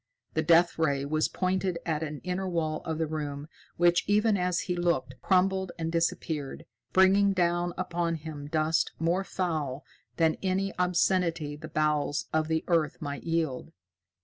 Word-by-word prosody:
The - - +1
Death 170 0 +4
Ray 140 -3 +1
was 155 +2 +1
pointed 185 -1 -1
at 160 -2 -1
an 150 -2 -5
inner 185 +1 -2
wall 155 -3 -1
of 160 -1 -2
the 160 - 0
room, 150 -2 -4 0.3
which, 175 0 +4
even 210 +1 +3
as 180 -2 0
he 180 - -2
looked, 170 -7 0
crumbled 190 0 +2
and 165 -1 -2
disappeared, 165 -4 -2 0.3
bringing 195 +1 +5
down 175 -1 +1
upon 175 -2 -1
him 150 -2 -7
dust 155 +1 +1
more 170 +4 +1
foul 155 -8 -3 0.3
than 160 -1 +3
any 195 0 0
obscenity 175 -4 +1
the 155 +1 -9
bowels 150 -1 0
of 155 0 +1
the 160 0 0
earth 165 -4 +1
might 145 -2 -5
yield. 165 -6 -2
165 Hz, 155 wpm, -28 LUFS, 155-180 Hz, 0.3 s, bringing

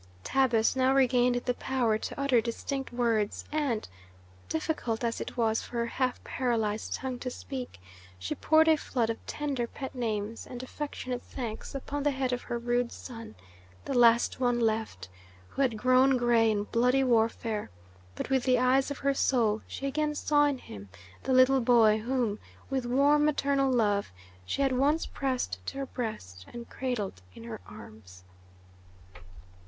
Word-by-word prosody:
Tabus 245 -4 +2
now 260 +1 +3
regained 250 -2 +3
the 250 - +1
power 240 -4 0
to - - -6
utter 275 -4 +3
distinct 265 +4 -4
words, 230 -4 0
and, 285 -8 -1 0.6
difficult 225 - -2
as 230 -1 -1
it - - -6
was 225 -1 +1
for 240 - -7
her 235 - +1
half 255 +1 -2
paralyzed 225 -4 -1
tongue 255 -2 -4
to 255 - -4
speak, 250 - -7 0.4
she 90 0 -4
poured 315 +1 +4
a 320 -1 +5
flood 235 -5 -1
of 225 - -8
tender 275 -5 -2
pet 265 +2 -7
names 225 -3 -3
and 250 0 -7
affectionate 255 -2 -5
thanks 235 -1 -6
upon 285 +1 -4
the 290 - +2
head 265 -2 -1
of 245 - -2
her 240 - -4
rude 240 0 0
son, 230 - -9 0.5
the 275 - -3
last 235 -1 +4
one 245 -2 +2
left, 220 - -1 0.4
who - - -3
had 250 -5 +1
grown 255 +3 +4
gray 235 -2 +3
in 205 -1 0
bloody 250 +5 +2
warfare; 225 -3 +1 0.5
but - - -5
with 265 -2 +2
the 255 -1 +3
eyes 255 +2 +3
of 285 - -4
her 275 0 +1
soul 230 -6 +1
she 275 - -6
again 300 +2 -1
saw 290 0 +3
in 285 -2 0
him 100 - -11 0.3
the - - -3
little 255 +1 +5
boy 230 -3 +5
whom, 235 -2 -1 0.3
with 260 -2 -1
warm 285 +4 +4
maternal 280 -2 +2
love, 205 - +1 0.4
she 280 - 0
had 270 - +2
once 285 +5 +2
pressed 250 - -3
to - - -4
her 275 - -2
breast 100 - -6
and 235 0 -9
cradled 225 - -3
in 115 - -11
her 115 -4 -7
arms. 100 -4 -13
245 Hz, 165 wpm, -29 LUFS, 225-270 Hz, 0.6 s, a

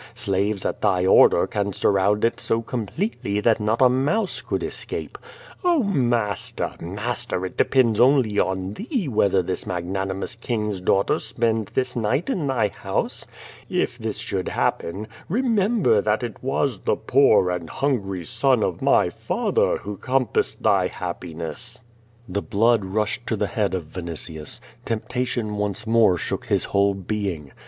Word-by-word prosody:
Slaves 100 -3 -1
at - - -2
thy 90 -1 +2
order 95 - +6
can 100 -1 -2
surround 100 +3 +2
it 115 - 0
so 115 0 0
completely 115 - -2
that 115 +1 +3
not 110 +4 +2
a - - +8
mouse 145 - 0
could - - -3
escape. - - -6 0.5
Oh, 345 -6 +3
master, 120 - 0
master, 105 +2 -3
it 95 - -6
depends 120 -5 +3
only 125 -5 +4
on 95 +1 -1
thee 230 - -3
whether 100 -6 +2
this 90 +1 -3
mag 90 -1 -3
nanimous 95 +2 -3
king's 105 -5 -2
daughter 95 +2 +2
spend 115 -3 -1
this 130 -1 0
night 125 - 0
in 170 - -1
thy 120 -6 +1
house. - - -3 0.4
If - - -1
this - - -3
should - - -3
happen, 100 +6 -1 0.2
remember 210 - +2
that 105 +3 0
it 120 -2 -6
was 135 -3 0
the - - +1
poor 125 -9 +4
and 85 -3 -4
hungry 100 - -1
son 130 - +2
of 90 - -2
my - - +3
father - - 0
who 105 0 -7
compassed 130 -1 0
thy - - +3
happiness." 90 +10 -6 0.4
The 100 +2 -2
blood 115 +1 +2
rushed 105 +4 -2
to 110 - 0
the 105 - 0
head 100 0 -1
of 90 - -3
Vinitius. 80 -3 -6 0.2
Temptation 115 -1 -2
once 105 +2 -2
more 115 -5 +4
shook - - -3
his - - +1
whole 100 0 +2
being. 95 -7 -4
105 Hz, 150 wpm, -23 LUFS, 95-125 Hz, 0.5 s, a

